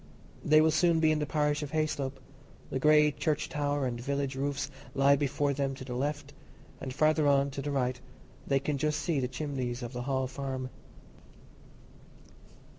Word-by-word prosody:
They 155 Hz, +1 st, +6 dB
will 160 Hz, 0 st, +4 dB
soon 165 Hz, +1 st, +3 dB
be 160 Hz, -1 st, +4 dB
in 155 Hz, -, +1 dB
the 150 Hz, -, -2 dB
parish 150 Hz, 0 st, +1 dB
of 150 Hz, 0 st, -6 dB
Hayslope; 140 Hz, -4 st, -1 dB, 0.5 s
the 130 Hz, -, -1 dB
grey 150 Hz, +1 st, +5 dB
church 150 Hz, +1 st, -1 dB
tower 145 Hz, -2 st, -1 dB
and 120 Hz, -2 st, -3 dB
village 140 Hz, 0 st, -2 dB
roofs 140 Hz, +1 st, -2 dB, 0.2 s
lie 140 Hz, +1 st, +5 dB
before 140 Hz, 0 st, 0 dB
them 135 Hz, -1 st, -1 dB
to 130 Hz, -, -9 dB
the 125 Hz, -, -5 dB
left, 145 Hz, +4 st, -3 dB, 0.5 s
and 130 Hz, -, -5 dB
farther 155 Hz, +2 st, +3 dB
on, 140 Hz, 0 st, +3 dB
to 140 Hz, -, -5 dB
the 145 Hz, -, -3 dB
right, 125 Hz, -2 st, -1 dB, 0.5 s
they 135 Hz, -1 st, +3 dB
can 140 Hz, 0 st, -2 dB
just 150 Hz, +1 st, 0 dB
see 150 Hz, 0 st, 0 dB
the 125 Hz, -, 0 dB
chimneys 130 Hz, -2 st, -4 dB
of 120 Hz, +1 st, -6 dB
the 125 Hz, -, -4 dB
Hall 130 Hz, 0 st, 0 dB
Farm. 130 Hz, -1 st, -4 dB
140 Hz, 180 wpm, -30 LUFS, 130-150 Hz, 0.5 s, They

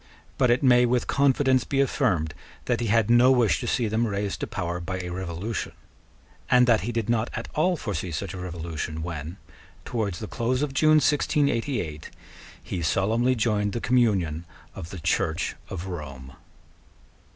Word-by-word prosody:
But 125 Hz, -, +4 dB
it 120 Hz, +3 st, +2 dB
may 125 Hz, -2 st, +5 dB
with 120 Hz, 0 st, +1 dB
confidence 135 Hz, -2 st, +3 dB
be 135 Hz, -, -2 dB
affirmed 95 Hz, -, +1 dB, 0.3 s
that -, -, 0 dB
he 120 Hz, -, -1 dB
had 110 Hz, 0 st, +3 dB
no 120 Hz, +2 st, +6 dB
wish 115 Hz, -11 st, +3 dB
to -, -, -4 dB
see 120 Hz, -, +1 dB
them 110 Hz, +2 st, 0 dB
raised 100 Hz, -1 st, -2 dB
to -, -, -3 dB
power 90 Hz, -2 st, -3 dB
by 95 Hz, +2 st, -4 dB
a 90 Hz, -1 st, -5 dB
revolution, 95 Hz, +4 st, -4 dB, 0.8 s
and 125 Hz, -1 st, +6 dB
that 115 Hz, -3 st, +4 dB
he 115 Hz, +5 st, -3 dB
did 115 Hz, -2 st, -2 dB
not 115 Hz, -1 st, +1 dB
at -, -, -5 dB
all 175 Hz, +3 st, +2 dB
foresee 100 Hz, -, -4 dB
such 90 Hz, +4 st, -4 dB
a 95 Hz, -, -6 dB
revolution 85 Hz, -3 st, -5 dB
when, 85 Hz, +1 st, -6 dB, 0.5 s
towards 105 Hz, -7 st, -2 dB
the 110 Hz, -, -5 dB
close 125 Hz, +6 st, -1 dB
of 145 Hz, -2 st, -3 dB
June 155 Hz, +2 st, +5 dB
1688, 130 Hz, -, 0 dB, 0.5 s
he 90 Hz, -, -4 dB
solemnly 115 Hz, +10 st, +1 dB
joined 105 Hz, -3 st, 0 dB
the 120 Hz, -, -2 dB
communion 95 Hz, -11 st, +1 dB, 0.3 s
of 80 Hz, -, -8 dB
the 95 Hz, -, -7 dB
Church 80 Hz, 0 st, -1 dB
of 95 Hz, -1 st, -5 dB
Rome. 70 Hz, -7 st, -7 dB
110 Hz, 170 wpm, -25 LUFS, 85-125 Hz, 0.8 s, no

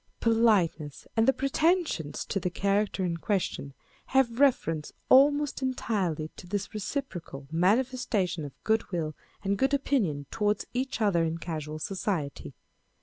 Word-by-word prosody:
Politeness 210 Hz, -10 st, +2 dB
and 225 Hz, 0 st, +3 dB
the -, -, +8 dB
pretensions 275 Hz, -, 0 dB
to 195 Hz, -, -1 dB
the 180 Hz, -, -1 dB
character 200 Hz, +1 st, 0 dB
in 170 Hz, -1 st, -1 dB
question 170 Hz, -7 st, -2 dB, 0.3 s
have 255 Hz, -3 st, +2 dB
reference 165 Hz, -, +2 dB, 0.2 s
almost 285 Hz, +2 st, +5 dB
entirely 190 Hz, -, -1 dB
to 180 Hz, -, -10 dB
this 205 Hz, +2 st, -3 dB
reciprocal 190 Hz, -, -5 dB
manifestation 200 Hz, -1 st, +1 dB
of 145 Hz, -, -10 dB
good 220 Hz, -1 st, +1 dB
will 160 Hz, -4 st, -2 dB, 0.3 s
and 200 Hz, 0 st, 0 dB
good 270 Hz, +2 st, +3 dB
opinion 205 Hz, -, 0 dB
towards 210 Hz, -2 st, 0 dB
each 255 Hz, -1 st, -2 dB
other 190 Hz, -6 st, +3 dB
in 165 Hz, 0 st, -1 dB
casual 155 Hz, -3 st, -5 dB
society. 165 Hz, -3 st, -3 dB
200 Hz, 135 wpm, -28 LUFS, 165-250 Hz, 0.3 s, the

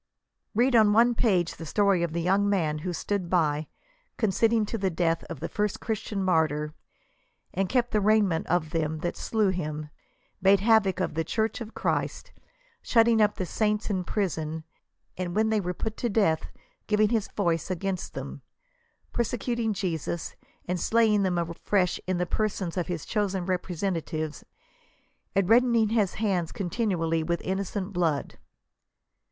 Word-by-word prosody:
Read 245 Hz, +3 st, +3 dB
on 215 Hz, -2 st, +6 dB
one 235 Hz, +3 st, +5 dB
page 185 Hz, -8 st, +1 dB
the 165 Hz, -, -7 dB
story 200 Hz, +1 st, +2 dB
of 170 Hz, -2 st, -1 dB
the 170 Hz, +1 st, -2 dB
young 195 Hz, +3 st, +2 dB
man 160 Hz, -6 st, +1 dB
who 180 Hz, +4 st, -3 dB
stood 185 Hz, +1 st, -2 dB
by, 155 Hz, -4 st, +1 dB, 0.5 s
consenting 220 Hz, +1 st, +2 dB
to 220 Hz, -, -4 dB
the 195 Hz, -3 st, 0 dB
death 165 Hz, -1 st, 0 dB
of -, -, -8 dB
the -, -, -2 dB
first 210 Hz, -1 st, -1 dB
Christian 210 Hz, -2 st, -3 dB
martyr, 155 Hz, -4 st, +1 dB, 0.8 s
and 190 Hz, 0 st, 0 dB
kept 245 Hz, -2 st, +1 dB
the 210 Hz, -, +2 dB
raiment 205 Hz, -5 st, +2 dB
of 160 Hz, -3 st, 0 dB
them 160 Hz, -1 st, -1 dB
that 175 Hz, -, -2 dB
slew 215 Hz, -3 st, +1 dB
him; 155 Hz, -4 st, -4 dB, 0.5 s
made 195 Hz, +1 st, +5 dB
havoc 205 Hz, -3 st, +3 dB
of 185 Hz, -, -1 dB
the 160 Hz, +1 st, 0 dB
church 220 Hz, +7 st, -1 dB
of 225 Hz, -1 st, -8 dB
Christ, -, -, -2 dB, 0.5 s
shut 230 Hz, -2 st, +4 dB
ting 230 Hz, -1 st, +4 dB
up 210 Hz, -1 st, +3 dB
the 185 Hz, -, -2 dB
saints 210 Hz, +3 st, 0 dB
in 185 Hz, -2 st, 0 dB
prison, 160 Hz, -5 st, -2 dB, 0.6 s
and 175 Hz, -1 st, -3 dB
when 220 Hz, +1 st, +3 dB
they 215 Hz, -1 st, +2 dB
were 180 Hz, -1 st, -2 dB
put 220 Hz, +5 st, -4 dB
to 240 Hz, -, -1 dB
death 200 Hz, -7 st, +2 dB, 0.4 s
giving 210 Hz, 0 st, +3 dB
his 225 Hz, -3 st, 0 dB
voice 170 Hz, -3 st, 0 dB
against 185 Hz, 0 st, -3 dB
them; -, -, -6 dB, 0.7 s
persecuting 235 Hz, -1 st, -1 dB
Jesus, 170 Hz, -4 st, -3 dB, 0.3 s
and 180 Hz, 0 st, -2 dB
slaying 220 Hz, 0 st, +3 dB
him 185 Hz, -2 st, +1 dB
afresh 170 Hz, +2 st, 0 dB
in 185 Hz, -1 st, 0 dB
the 180 Hz, -, 0 dB
persons 195 Hz, -3 st, -2 dB
of 180 Hz, -2 st, -1 dB
his 175 Hz, -4 st, -4 dB
chosen 195 Hz, -4 st, -1 dB
representatives, 175 Hz, -4 st, -2 dB, 0.9 s
and 195 Hz, -2 st, +2 dB
reddening 230 Hz, -1 st, +4 dB
his 210 Hz, -4 st, +1 dB
hands 185 Hz, -6 st, 0 dB
continually 175 Hz, -5 st, -1 dB
with 170 Hz, +1 st, -1 dB
innocent 195 Hz, +1 st, -3 dB
blood. 165 Hz, -5 st, -1 dB
190 Hz, 160 wpm, -27 LUFS, 170-215 Hz, 0.9 s, on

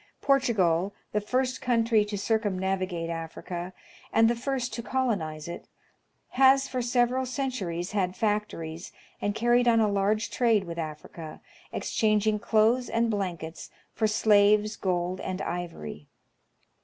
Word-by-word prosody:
Portugal, 205 Hz, -10 st, +2 dB, 0.2 s
the 210 Hz, -, 0 dB
first 255 Hz, +4 st, -1 dB
coun 240 Hz, -3 st, +2 dB
try 225 Hz, -2 st, +4 dB
to 210 Hz, 0 st, -3 dB
circumnavigate 190 Hz, -5 st, -1 dB
Africa, 170 Hz, +2 st, -5 dB, 0.4 s
and 225 Hz, 0 st, +5 dB
the 235 Hz, -, +2 dB
first 250 Hz, 0 st, -2 dB
to 235 Hz, -, -3 dB
colonize 200 Hz, -13 st, -2 dB
it, 170 Hz, -, -7 dB, 0.6 s
has 270 Hz, +1 st, +5 dB
for 255 Hz, -1 st, -2 dB
several 245 Hz, +1 st, +1 dB
centui'ies 245 Hz, -10 st, -3 dB
had 190 Hz, -3 st, 0 dB
factories, 200 Hz, -6 st, -2 dB, 0.3 s
and 205 Hz, 0 st, -1 dB
carried 240 Hz, +1 st, +3 dB
on 230 Hz, -1 st, +5 dB
a 220 Hz, -, +4 dB
large 205 Hz, +2 st, 0 dB
trade 230 Hz, -5 st, +2 dB
with 170 Hz, -2 st, -6 dB
Africa, 155 Hz, 0 st, -7 dB, 0.3 s
exchanging 215 Hz, -1 st, +1 dB
clothes 225 Hz, +3 st, +2 dB
and 230 Hz, 0 st, +1 dB
blankets 175 Hz, -5 st, -4 dB, 0.2 s
for 220 Hz, -, +1 dB
slaves, 210 Hz, 0 st, +4 dB
gold 180 Hz, -1 st, -1 dB
and 185 Hz, 0 st, -4 dB
ivory. 165 Hz, -, -5 dB
210 Hz, 130 wpm, -27 LUFS, 180-235 Hz, 0.6 s, and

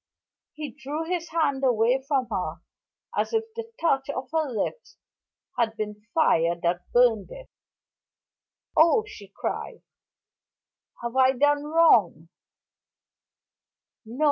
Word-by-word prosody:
He 300 Hz, -3 st, -6 dB
drew 295 Hz, +4 st, -5 dB
his 345 Hz, -1 st, -3 dB
hand 290 Hz, -5 st, 0 dB
away 245 Hz, +1 st, +3 dB
from 275 Hz, -3 st, +1 dB
her 175 Hz, -4 st, -2 dB, 0.6 s
as -, -, -1 dB
if 445 Hz, 0 st, +2 dB
the 460 Hz, -, -3 dB
soft 455 Hz, 0 st, -16 dB
touch 270 Hz, -5 st, +1 dB
of 260 Hz, -1 st, -5 dB
her 315 Hz, -2 st, 0 dB
lips 255 Hz, -, -4 dB, 0.6 s
had 225 Hz, -1 st, 0 dB
been 210 Hz, 0 st, -6 dB
fire 170 Hz, -, +3 dB
that 175 Hz, +1 st, -1 dB
burned 235 Hz, -5 st, +3 dB
it. -, -, -12 dB, 1.2 s
"Oh," 335 Hz, +8 st, +5 dB
she 210 Hz, -, -12 dB
cried, 195 Hz, -, -5 dB, 1.2 s
"have 235 Hz, +1 st, -4 dB
I 260 Hz, 0 st, +5 dB
done 290 Hz, +2 st, +2 dB
wrong?" 235 Hz, -, +3 dB
265 Hz, 115 wpm, -25 LUFS, 220-320 Hz, 1.2 s, Oh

